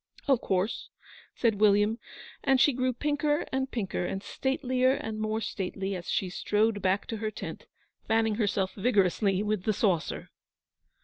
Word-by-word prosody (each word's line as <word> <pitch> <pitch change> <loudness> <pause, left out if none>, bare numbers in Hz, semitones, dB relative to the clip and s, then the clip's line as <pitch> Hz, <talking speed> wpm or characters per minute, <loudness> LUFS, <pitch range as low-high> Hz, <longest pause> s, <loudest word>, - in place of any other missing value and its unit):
'Of 270 -4 +3
course,' 190 +4 -1 0.5
said 225 -4 +1
William; 210 +2 +4 0.4
and 270 -2 +4
she 285 +1 +5
grew 255 +1 +1
pinker 295 +3 0
and 265 0 0
pinker 205 -8 -2
and 195 +2 -3
statelier 260 -1 +1
and 220 -6 -4
more 215 0 -1
stately, 195 -1 -3
as 175 -2 -6
she 190 - 0
strode 210 +3 0
back 190 +1 +1
to 225 - -4
her 215 0 -2
tent, - - -7 0.4
fanning 225 0 +2
herself 195 -2 0
vigorously 195 -2 +2
with 210 -2 0
the 215 - +2
saucer. 190 -6 0
215 Hz, 150 wpm, -29 LUFS, 195-255 Hz, 0.5 s, she